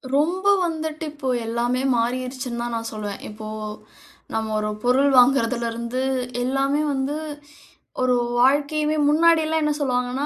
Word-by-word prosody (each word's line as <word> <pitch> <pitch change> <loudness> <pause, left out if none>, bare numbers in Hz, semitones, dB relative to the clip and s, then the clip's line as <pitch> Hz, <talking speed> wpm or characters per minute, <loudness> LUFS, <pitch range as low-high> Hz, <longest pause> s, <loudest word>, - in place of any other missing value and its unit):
ரொம்ப 350 +7 +1 0.2
வந்துட்டு 315 -1 -3
இப்போ 290 -3 -4 0.2
எல்லாமே 240 +2 0
மாறிருச்சுன்னு 250 +1 -2
தான் 240 0 -4
நான் 230 0 -4
சொல்லுவேன். 205 -2 -5
இப்போ 215 0 -9 0.9
நம்ம 220 0 -2
ஒரு 210 0 -1
பொருள் 260 +3 +4
வாங்குறதுலருந்து 235 -1 +1 0.4
எல்லாமே 275 +3 +1
வந்து 270 +2 -1 0.9
ஒரு 255 -1 +3 0.2
வாழ்க்கையுமே 295 +4 +2
முன்னாடில்லாம் 320 +1 +3
என்ன 300 0 +1
சொல்லுவாங்கன்னா, 250 0 -1
255 Hz, 115 wpm, -23 LUFS, 235-295 Hz, 0.9 s, பொருள்